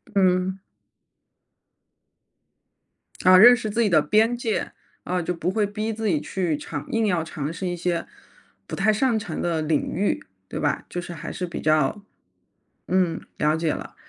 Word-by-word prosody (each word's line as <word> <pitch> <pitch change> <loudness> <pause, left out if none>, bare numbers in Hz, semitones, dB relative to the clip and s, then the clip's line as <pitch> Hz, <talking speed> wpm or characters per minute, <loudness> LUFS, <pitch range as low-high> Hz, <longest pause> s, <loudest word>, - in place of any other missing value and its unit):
嗯。 185 0 +2 2.7
啊， 185 0 +8
认 240 +6 +9
识 225 -3 -4
自 230 +3 0
己 215 - +3
的 155 -3 +5
边 220 +9 +3
界。 230 -3 -2 0.3
啊， 180 0 -1
就 180 - -2
不 170 0 -2
会 210 +2 +1
逼 215 +2 -3
自 220 0 -3
己 155 -7 +1
去 175 -5 -1
尝 150 0 -6
硬 225 -1 +1
要 175 -4 +1
尝 155 -2 -5
试 170 +3 -5
一 175 - -2
些 175 -1 -2 0.6
不 - - -5
太 215 +3 +2
擅 230 +1 +2
长 175 -7 -4
的 170 -2 0
领 155 -1 0
域， 200 +4 -1 0.2
对 - - -5
吧。 - - -1
就 175 - -4
是 175 - -8
还 165 - -7
是 180 - -4
比 170 - -6
较 155 +6 +1 0.8
嗯， 185 -3 +1 0.2
了 150 +1 +2
解 160 -1 0
了。 - - -8
180 Hz, 185 characters per minute, -24 LUFS, 165-210 Hz, 2.7 s, 认